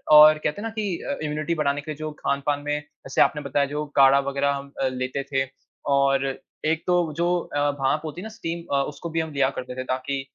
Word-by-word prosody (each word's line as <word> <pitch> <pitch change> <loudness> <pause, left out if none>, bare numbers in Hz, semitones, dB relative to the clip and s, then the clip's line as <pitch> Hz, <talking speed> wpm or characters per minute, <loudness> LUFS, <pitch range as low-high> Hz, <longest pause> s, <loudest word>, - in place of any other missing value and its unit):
और 155 +1 +10
कहते 150 +7 -1
हैं - - -6
ना - - -3
कि 200 -5 -1
अ, - - -3
इम्यूनिटी 150 +2 -1
बढ़ाने 145 -2 0
के 155 - -6
लिए 150 - -6
जो 155 0 -4
खान-पान 140 +1 0
में, 145 0 0 0.3
जैसे 135 - +2
आपने 150 - +3
बताया, 140 0 +1
जो 150 +2 -3
काढ़ा 135 0 +7
वग़ैरह 140 +1 +1
हम 140 0 -6
अ, 135 - +3
लेते 130 +1 -2
थे 135 -1 +2 0.5
और 135 0 +3 0.4
एक 160 +1 +1
तो 175 -3 +2
जो 170 +1 +2 0.3
अ, 145 0 +2
भाँप 135 +3 +1
होती 155 +3 -5
है - - -8
ना, - - -5
स्टीम 170 -6 -5
अ, 140 - +3
उसको 150 +3 -7
भी 165 0 -1
हम 160 -1 -2
लिया 135 -1 +3
करते 125 0 -6
थे, 130 - -3
ताकि 130 +2 -2
145 Hz, 240 wpm, -25 LUFS, 140-155 Hz, 0.5 s, और